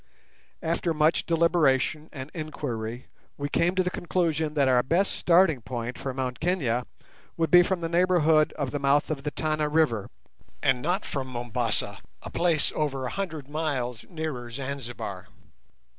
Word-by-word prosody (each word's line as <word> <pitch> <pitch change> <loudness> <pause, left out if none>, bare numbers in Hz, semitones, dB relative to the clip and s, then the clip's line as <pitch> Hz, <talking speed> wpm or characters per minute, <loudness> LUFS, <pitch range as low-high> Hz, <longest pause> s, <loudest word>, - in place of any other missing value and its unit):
After 165 0 0
much 155 +2 +2
deliberation 160 -3 +2
and 135 +1 -8
inquiry 125 -7 -4 0.3
we 145 0 -3
came 175 +4 +2
to 185 - +3
the 180 - -1
conclusion 160 -4 -1
that 140 -2 +3
our 125 -1 +5
best 170 +10 +1
starting 170 -6 +4
point 120 +1 -4
for 135 - -3
Mt 130 -1 -3
Kenia 135 -9 0 0.5
would 165 -2 0
be 175 - +9
from 180 0 0
the 165 - -1
neighbourhood 170 -3 +3
of 140 -3 -3
the 145 - -2
mouth 140 +2 +2
of 145 -3 -2
the 150 - -2
Tana 155 +1 -1
River, 150 -10 +1 0.5
and 130 -2 +3
not 180 +8 0
from 135 -2 -3
Mombassa, 120 -4 -1 0.2
a - - -7
place 170 -3 +2
over 140 -3 -1
100 155 0 -4
miles 140 -6 -2
nearer 155 -8 -4
Zanzibar. 120 -7 -5
150 Hz, 155 wpm, -27 LUFS, 125-165 Hz, 0.5 s, be